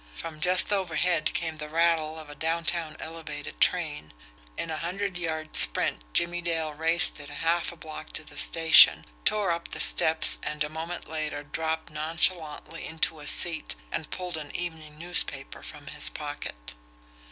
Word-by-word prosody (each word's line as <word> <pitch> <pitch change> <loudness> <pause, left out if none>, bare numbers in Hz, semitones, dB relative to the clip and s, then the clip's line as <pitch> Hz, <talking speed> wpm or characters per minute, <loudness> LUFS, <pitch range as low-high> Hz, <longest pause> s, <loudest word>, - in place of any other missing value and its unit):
From 160 -2 -8
just 180 +4 +4
overhead 175 -3 -1
came 165 -2 -3
the 150 0 -7
rattle 160 -1 0
of 155 -1 -11
a 145 - -10
downtown 165 +1 -3
elevated 155 -2 -9
train. 155 - -1 0.4
In 165 - -4
a 155 - -4
hundred 185 +4 -4
yard 160 -3 -5
sprint, - - +5
Jimmie 175 - 0
Dale 165 -2 -3
raced 160 +1 +6
it 145 - -10
a 145 - -10
half 165 +3 -1
block 155 -1 -10
to - - -3
the 145 - -13
station, 165 +2 +6 0.2
tore 205 -4 +1
up 170 0 -4
the - - -8
steps 160 -1 +4
and 150 0 -3
a 150 - -5
moment 165 +3 -7
later 155 -2 -4
dropped 160 +2 -4
nonchalantly 160 +1 0
into 160 0 -2
a 150 - -11
seat 165 -2 -1 0.2
and 155 - -5
pulled 180 -2 -5
an 150 -2 -9
evening 160 -3 -6
newspaper 160 -5 -1
from 150 -2 -12
his - - +1
pocket. 145 - -8
160 Hz, 165 wpm, -26 LUFS, 150-170 Hz, 0.4 s, raced